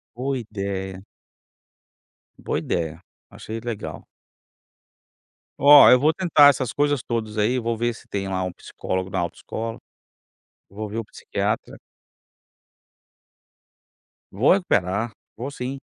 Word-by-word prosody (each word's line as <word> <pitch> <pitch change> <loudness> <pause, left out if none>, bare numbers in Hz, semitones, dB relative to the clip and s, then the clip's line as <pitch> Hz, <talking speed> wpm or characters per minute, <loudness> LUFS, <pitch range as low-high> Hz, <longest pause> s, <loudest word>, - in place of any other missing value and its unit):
Boa 130 +2 -2
idéia. 95 -3 -5 1.3
Boa - - -2
idéia, 80 -1 -3 0.3
achei 110 +1 -7
legal. 115 -2 -6 1.5
Oh, 145 0 +9
eu 125 - +8
vou 150 +5 +3
tentar 155 -5 +6
essas 130 -3 -1
coisas 145 -2 +1
todas 110 -2 -4
aí, 120 +5 +2
vou 115 -1 -2
ver 120 +1 0
se - - -15
tem 100 -1 -3
lá 95 -1 -2
um 90 - -3
psicólogo 95 +1 -5
na - - -2
autoescola, 110 +6 -4 0.9
vou 105 +2 -6
ver 110 +3 -5
o 115 - -3
psiquiatra. - - -3 2.6
Vou 110 +9 +3
recuperar, 110 - 0 0.3
vou 130 +5 -5
sim. 135 0 -5
115 Hz, 115 wpm, -23 LUFS, 100-130 Hz, 2.6 s, Oh